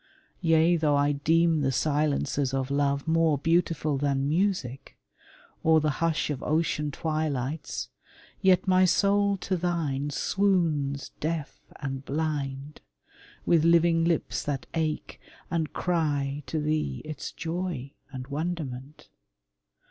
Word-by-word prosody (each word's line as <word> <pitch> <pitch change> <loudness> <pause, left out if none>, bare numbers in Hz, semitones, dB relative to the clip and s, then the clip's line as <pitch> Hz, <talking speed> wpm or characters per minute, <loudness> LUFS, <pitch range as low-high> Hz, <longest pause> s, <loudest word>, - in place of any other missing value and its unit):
Yea, 165 0 +4
though 150 -2 +2
I 145 +1 +3
deem 160 +2 +2
the 135 -1 +1
silences 145 -1 0
of 135 0 -2
love 140 +1 0
More 160 -2 +3
beautiful 160 -2 +1
than 140 -1 0
music, 160 - -1 0.7
or 160 0 +5
the 155 0 +1
hush 165 -2 +1
Of 140 -2 -4
ocean 155 -1 0
twilights, 155 -2 -3 0.5
yet 185 0 +4
my 185 0 +5
soul 200 +2 +3
to 185 +1 -2
thine 165 -6 -1
Swoons 155 -5 0
deaf 155 -1 -3
and 135 -2 -5
blind, 145 -1 -3 0.6
with 165 -2 +4
living 170 0 +4
lips 165 -2 0
that 145 -2 -3
ache 155 -2 -2 0.3
And 165 -3 -1
cry 145 -5 -1
to 160 - -2
thee 150 - -1
its 155 0 -6
joy 165 -5 -4 0.2
and 130 -2 -6
wonderment. 145 -2 -5
155 Hz, 120 wpm, -27 LUFS, 140-165 Hz, 0.7 s, or